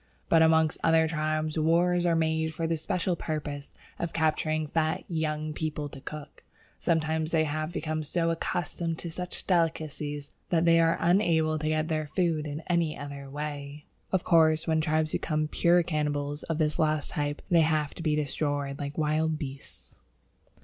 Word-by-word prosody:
But 165 - +5
amongst 160 -1 +4
other 160 0 +4
tribes 155 0 -1
wars 175 +2 +3
are 170 - +3
made 160 -1 0
for 165 - -2
the 165 0 +1
special 180 +2 -1
purpose 145 -3 -4 0.3
of 170 - -3
capturing 155 -1 +1
fat 155 +1 0
young 155 -2 -2
people 150 -1 -3
to 135 - -11
cook. 150 +1 -9 0.4
Sometimes 160 -1 0
they 160 -2 +3
have 155 +1 -2
become 155 -3 -2
so 165 +2 0
accustomed 165 0 -2
to 170 - -5
such 180 +2 -5
delicacies 155 -4 -1 0.2
that 170 -1 +2
they 165 0 +6
are 165 0 +3
unable 165 -3 +2
to 155 - -2
get 155 0 0
their 155 -2 -1
food 160 -2 0
in 150 +2 -5
any 170 -3 0
other 140 -1 -7
way. 145 0 -6 0.3
Of 190 -2 +1
course, 160 -2 +4
when 160 -1 +2
tribes 155 0 +1
become 155 -1 -1
"pure 175 +3 +3
cannibals" 145 -2 -2
of 165 - -3
this 155 0 0
last 155 -2 +1
type 145 0 -2
they 170 -1 +6
have 155 -2 +1
to - - -8
be 155 -2 +1
destroyed 145 -1 -2
like 145 0 -5
wild 155 0 +1
beasts. 140 -2 -9
155 Hz, 170 wpm, -28 LUFS, 150-165 Hz, 0.4 s, they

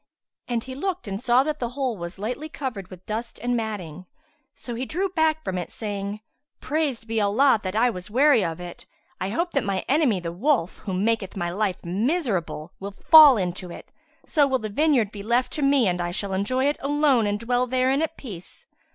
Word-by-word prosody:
and 235 -2 -1
he 260 - -8
looked 360 - -3
and 195 +1 -4
saw 250 +1 +4
that 300 +1 -3
the 240 - -2
hole 260 -4 -1
was 170 -1 -7
lightly 245 +10 -4
covered 240 -11 -5
with 185 -1 -13
dust 225 +2 -4
and 245 0 -1
matting. 185 -7 -5 0.5
So 240 - -7
he 235 +2 -3
drew 365 +8 -2
back 315 -3 +1
from 185 -1 -2
it 175 - -5
saying, 205 -1 -5 0.4
"Praised 285 -6 -1
be 225 -1 0
Allah 225 +4 +4
that 185 0 -4
I 240 +3 +3
was 180 -2 -7
wary 260 0 +4
of 165 -1 -3
it! 175 -1 -9 0.3
I 185 - -2
hope 340 - -1
that 275 -6 0
my 195 -1 -2
enemy, 270 - +2
the 170 -1 -5
wolf, 200 - 0
who 190 -3 -4
maketh 205 0 -1
my 175 -2 -2
life 195 -2 -2
miserable, 195 - -1
will 200 0 -7 0.2
fall 305 -6 +10
into 180 -1 -3
it; - - -11 0.3
so 290 -2 +3
will 265 -1 +1
the 220 -3 -5
vineyard 255 -3 +2
be 205 - -8
left 235 +4 0
to 305 - -3
me 275 -5 +4
and 180 -1 0
I 175 - -2
shall 195 +2 -3
enjoy 255 +8 0
it 290 +1 +1
alone 280 -5 +2
and 205 0 -1
dwell 245 +2 0
therein 260 +3 +1
at 320 0 -2
peace." 190 -10 -10
225 Hz, 210 wpm, -24 LUFS, 195-275 Hz, 0.5 s, fall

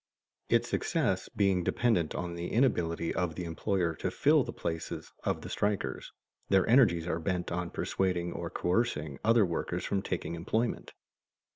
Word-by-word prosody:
Its - - +3
success - - 0
being 95 -3 +2
dependent 100 -7 +1
on 90 -1 -3
the 85 0 -4
inability 85 -10 +1
of 85 -3 -1
the 90 - -4
employer 85 +1 -1
to - - -3
fill - - +4
the - - -5
places 80 -1 -5
of - - 0
the - - -7
strikers, 105 -1 -2 0.4
their 95 -2 +4
energies 110 -10 +5
are 85 -1 -1
bent 90 +1 -2
on 90 0 -2
persuading 90 -2 -1
or 85 0 -4
coercing 90 - -1
other 115 -1 +5
workers 85 -2 -2
from 100 - 0
taking 90 -3 -3
employment. 110 +8 -1
90 Hz, 155 wpm, -30 LUFS, 85-100 Hz, 0.4 s, energies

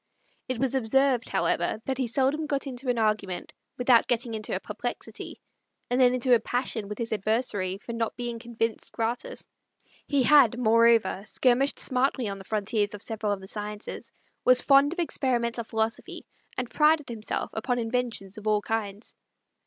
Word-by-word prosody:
It 255 -2 -2
was 265 +1 +1
observed, 265 0 +2
however, - - 0
that 265 -1 -2
he 255 - 0
seldom 275 +6 0
got 280 -1 -1
into 255 -1 -5
an 245 - +1
argument 215 -4 -1 0.2
without 245 -1 +4
getting 235 -1 0
into 215 -1 -3
a - - -1
perplexity, - - -6 0.5
and 250 +1 +3
then 250 -1 +6
into 255 0 +2
a 235 - +6
passion 240 -2 -2
with 210 - -6
his 230 -2 -3
adversary 205 -3 -1
for 235 +3 -8
not 230 -1 -2
being 240 -1 -4
convinced 230 -1 -3
gratis. 240 - -3 0.6
He 280 -3 +2
had, 255 -4 +6
moreover, 230 -4 +4
skirmished 260 +4 +2
smartly 255 -2 +1
on 195 -1 -5
the 190 - -11
frontiers 210 0 0
of 205 - -10
several 215 -2 -2
of 200 -1 -2
the 190 - -10
sciences, 210 +1 -5 0.3
was 255 0 +6
fond 280 +2 +5
of 355 - -6
experimental 240 -8 -1
philosophy, 220 0 -3 0.3
and 255 - -2
prided 300 +2 +3
himself 220 -2 -3
upon 245 +3 -1
inventions 230 -4 -2
of 215 - -8
all 210 -1 +2
kinds. 215 -1 -4
235 Hz, 170 wpm, -27 LUFS, 215-255 Hz, 0.6 s, then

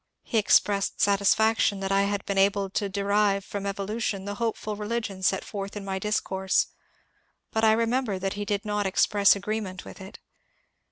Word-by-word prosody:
He 230 - 0
expressed 200 -1 +2
satisfaction 205 +1 +3
that 195 0 -2
I 195 0 +3
had 200 0 -2
been 200 -1 0
able 195 0 +2
to 200 0 -1
derive 200 0 +1
from 200 -1 -5
evolution 200 0 -3
the 205 - -4
hopeful 220 -2 -2
religion 210 -2 -4
set 190 0 +1
forth 200 0 -6
in 200 - -7
my 190 -1 -3
discourse, 190 -2 0 0.9
but 220 - -1
I 220 -1 +6
remember 230 -2 0
that 195 +1 -2
he 205 - -4
did 205 +1 -2
not 210 -1 -1
express 200 +1 +4
agreement 200 -2 -4
with - - -11
it. 190 - -10
200 Hz, 170 wpm, -26 LUFS, 195-210 Hz, 0.9 s, I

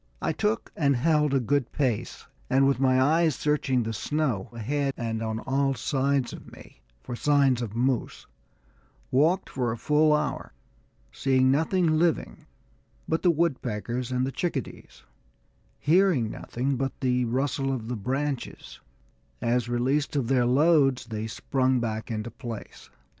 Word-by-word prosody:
I - - -1
took 110 +1 -1
and 140 -3 +2
held 150 +2 +2
a 135 - +3
good 130 +1 0
pace, 130 -7 -2 0.2
and 135 +1 +4
with 135 -2 +1
my 130 -1 +3
eyes 155 +2 +3
searching 135 -4 0
the 110 0 -3
snow 130 -4 -1
ahead 135 +4 -2
and 115 -2 -3
on 110 0 -2
all 135 0 0
sides 135 +1 0
of - - -11
me - - -15 0.2
for 120 - -5
signs 140 -2 +2
of 110 -2 -5
moose, 125 0 -1 0.9
walked 160 +8 +2
for 125 -3 -2
a 115 - -4
full 150 +5 +3
hour, 150 - -1 0.6
seeing 130 -1 +2
nothing 160 +2 +2
living 160 - -1 0.6
but 160 - 0
the 180 - +3
woodpeckers 130 -7 -1
and 125 0 +1
the 135 - -3
chickadees, 140 - -5 0.7
hearing 160 - +3
nothing 130 +2 -3
but 135 +1 -3
the 125 -1 +1
rustle 135 +3 -1
of 120 -4 -4
the 125 - -3
branches, 125 - -4 0.6
as 120 0 0
released 130 +5 0
of 135 -5 0
their 125 -3 +3
loads 135 -1 +3
they 110 -1 -4
sprang 130 +3 0
back 110 -2 -3
into 110 0 -4
place. 115 -5 -9
130 Hz, 145 wpm, -26 LUFS, 120-145 Hz, 0.9 s, and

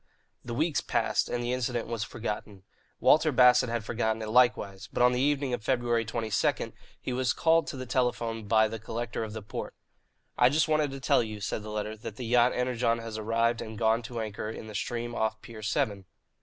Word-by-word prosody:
The 120 -1 -5
weeks 155 +3 +1
passed - - 0
and 120 0 -2
the 120 +1 -1
incident 125 -2 -1
was 115 -2 -3
forgotten. 105 -3 -5 0.4
Walter 155 0 +5
Bassett 125 -1 +5
had 115 -2 -2
forgotten 110 -1 -1
it 110 - -5
likewise; 120 -5 +2
but - - +1
on 125 - +6
the 125 - 0
evening 140 -2 +1
of 115 - -3
February 120 -2 +1
22, 110 -1 -1 0.3
he 125 - -4
was 130 0 +1
called 165 0 +3
to 140 - -5
the 130 - -5
telephone 115 -3 -1
by 110 0 +4
the 110 +1 -6
Collector 115 +1 -4
of 110 -1 -6
the 110 -1 -6
Port. 105 - -6 0.6
"I 125 - +7
just 150 +2 +2
wanted 155 -1 +2
to 135 0 -7
tell 135 - +3
you," 110 -2 -5
said 105 - -3
the 105 - -8
latter, 105 0 -3
"that 110 0 -8
the 125 - -6
yacht 120 +1 +4
Energon 125 -2 +1
has 115 -1 -6
arrived 115 +2 +1
and 110 0 -7
gone 115 +1 +2
to 120 0 -6
anchor 110 -1 -4
in 110 - -7
the 110 - -9
stream 120 +3 -3
off 110 -1 -1
Pier 115 -2 -10
Seven." 105 -3 -1
115 Hz, 210 wpm, -29 LUFS, 110-125 Hz, 0.6 s, I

